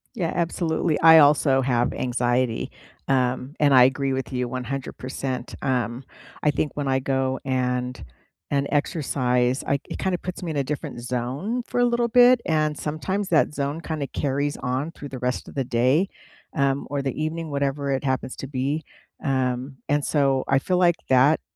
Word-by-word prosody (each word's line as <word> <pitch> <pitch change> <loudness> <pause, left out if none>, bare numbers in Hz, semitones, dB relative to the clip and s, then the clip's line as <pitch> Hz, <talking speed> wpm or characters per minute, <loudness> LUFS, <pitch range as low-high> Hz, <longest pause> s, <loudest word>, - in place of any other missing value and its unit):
Yeah, 170 -6 -1
absolutely, 165 -2 0
I 160 0 +9
also 145 -2 +5
have 125 -2 +1
anxiety, 120 -1 0 0.4
um, 130 +1 0
and 145 -2 +4
I 125 -1 +8
agree 135 +1 +2
with 130 +1 -3
you 125 -1 -1
100%.. 130 0 -5
Um, 125 -1 -1 0.4
I 150 - +3
think 150 - -1
when 145 -2 -2
I 130 0 +2
go 130 0 0
and 125 -1 -1 0.5
and 140 -1 +1
exercise, 130 -4 +1
I 140 - +2
it - - -4
kinda 185 -2 0
puts 180 +2 -6
me 170 -3 -3
in 145 - -3
a 140 - +1
different 135 -3 -5
zone 130 - -3
for 245 - 0
a - - +5
little 240 0 +1
bit, 245 +1 +6
and 155 -3 +1
sometimes 185 +6 -2
that 155 -2 +3
zone 145 +3 -2
kinda 155 -4 -3
carries 145 +1 -1
on 135 +5 -2
through 145 -4 -9
the 130 -1 -7
rest 125 0 -2
of - - -13
the 135 -2 -1
day, 130 +10 +2 0.5
um, 140 -1 +1
or 140 -1 -1
the 135 +2 -3
evening, 160 0 -3
whatever 140 0 -1
it 135 +1 -1
happens 130 -1 -2
to 135 - -6
be. 140 +3 -2 0.4
Um, 130 -1 -1
and 145 0 +1
so, 135 -3 +1
I 135 - +3
feel 180 +5 0
like 175 -2 +4
that 135 +4 +5
140 Hz, 180 wpm, -24 LUFS, 130-155 Hz, 0.5 s, I